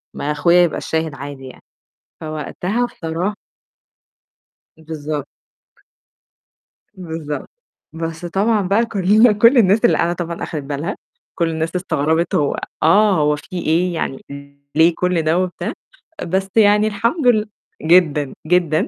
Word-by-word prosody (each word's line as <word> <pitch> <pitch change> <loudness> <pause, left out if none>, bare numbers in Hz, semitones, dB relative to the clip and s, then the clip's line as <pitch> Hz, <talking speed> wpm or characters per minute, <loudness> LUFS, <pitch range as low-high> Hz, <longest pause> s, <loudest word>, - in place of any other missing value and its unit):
ما 145 - -2
أخويا 170 +4 +4
يبقى 170 - 0
الشاهد 160 -2 -2
عادي 140 -1 -8
يعني. 130 - -14 0.6
فوقتها 175 +9 -3
بصرا 175 0 -4 1.4
بالضبط. 155 -2 -5 1.7
بالضبط، 160 -6 -6 0.4
بس 165 +1 -5
طبعًا 205 +5 +1
بقى 210 +5 +2
كلّنا 215 +2 +4
كُلّ 230 +6 +5
الناس 215 +1 +4
اللي - - +4
قاعدة 170 - +1
طبعًا 170 -1 -5
أخدِت 150 -3 -4
بالها، 145 +3 -4 0.4
كُلّ 170 -1 +2
الناس 160 +1 -3
استغربت 160 -1 0
هو 145 - +1 0.3
آه، 200 +5 +5
هو 150 0 +2
في 145 - -13
إيه، 175 +1 0
يعني 135 -5 -4 0.5
ليه 165 +2 +5
كُلّ 180 -2 0
ده 160 +2 +1
وبتاع، 185 -1 -3 0.5
بس 190 +3 -1
يعني 210 -1 +5
الحمد 230 - 0
لل 215 -3 +3 0.3
جدًا، 155 -4 +3
جدًا، 170 -2 +2
170 Hz, 125 wpm, -19 LUFS, 155-200 Hz, 1.7 s, كُلّ